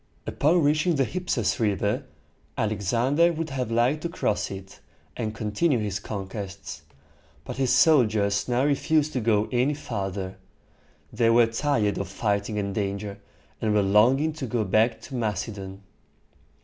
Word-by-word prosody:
Upon 160 Hz, +3 st, +2 dB
reaching 155 Hz, +4 st, +2 dB
the 135 Hz, -2 st, +2 dB
Hyph´a 180 Hz, +4 st, -5 dB
sis -, -, 0 dB
River, 105 Hz, +1 st, 0 dB, 0.5 s
Alexander 120 Hz, -, +2 dB
would 160 Hz, -1 st, -4 dB
have 130 Hz, -3 st, -2 dB
liked 120 Hz, +6 st, +1 dB
to 170 Hz, -, -3 dB
cross 165 Hz, -, -1 dB
it, 95 Hz, 0 st, -9 dB, 0.4 s
and 110 Hz, -2 st, -3 dB
continue 115 Hz, +8 st, +1 dB
his 105 Hz, -2 st, -2 dB
conquests; 100 Hz, -5 st, -6 dB, 0.6 s
but -, -, -6 dB
his 130 Hz, -2 st, +1 dB
soldiers 110 Hz, -9 st, +3 dB
now 125 Hz, +2 st, +1 dB
refused 150 Hz, +1 st, +1 dB
to 130 Hz, -, 0 dB
go 110 Hz, -1 st, +2 dB
any 130 Hz, +4 st, +1 dB
farther. 95 Hz, -8 st, -4 dB, 0.8 s
They 115 Hz, -2 st, +2 dB
were 115 Hz, +1 st, +6 dB
tired 115 Hz, -3 st, 0 dB
of -, -, -3 dB
fighting 105 Hz, 0 st, -1 dB
and 100 Hz, -1 st, -2 dB
danger, 100 Hz, 0 st, -3 dB, 0.4 s
and 105 Hz, -1 st, +1 dB
were 105 Hz, -, +4 dB
longing 125 Hz, +10 st, +3 dB
to 150 Hz, -4 st, -5 dB
go 115 Hz, 0 st, 0 dB
back 110 Hz, +3 st, +2 dB
to 135 Hz, -, -11 dB
Macedon. 100 Hz, -4 st, -4 dB
115 Hz, 150 wpm, -25 LUFS, 100-135 Hz, 0.8 s, were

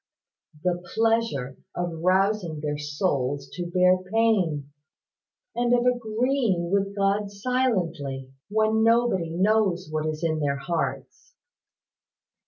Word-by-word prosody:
"The 175 Hz, -1 st, 0 dB
pleasure 225 Hz, -, +1 dB, 0.2 s
of 175 Hz, -2 st, -3 dB
rousing 185 Hz, -2 st, +1 dB
their 150 Hz, -1 st, -2 dB
souls 145 Hz, -3 st, -1 dB
to 175 Hz, -1 st, -4 dB
bear 180 Hz, +1 st, +4 dB
pain, 185 Hz, -11 st, +1 dB, 0.8 s
and 240 Hz, +1 st, +3 dB
of 240 Hz, 0 st, +1 dB
agreeing 235 Hz, -6 st, +1 dB
with 200 Hz, 0 st, 0 dB
God 200 Hz, +1 st, +1 dB
silently, 180 Hz, -, -1 dB, 0.2 s
when 220 Hz, +1 st, +2 dB
nobody 230 Hz, -7 st, +3 dB
knows 190 Hz, -1 st, +1 dB
what 155 Hz, 0 st, -1 dB
is 155 Hz, +1 st, -4 dB
in 160 Hz, -1 st, 0 dB
their 140 Hz, -2 st, 0 dB
hearts. 170 Hz, -, -4 dB
185 Hz, 110 wpm, -25 LUFS, 155-220 Hz, 0.8 s, bear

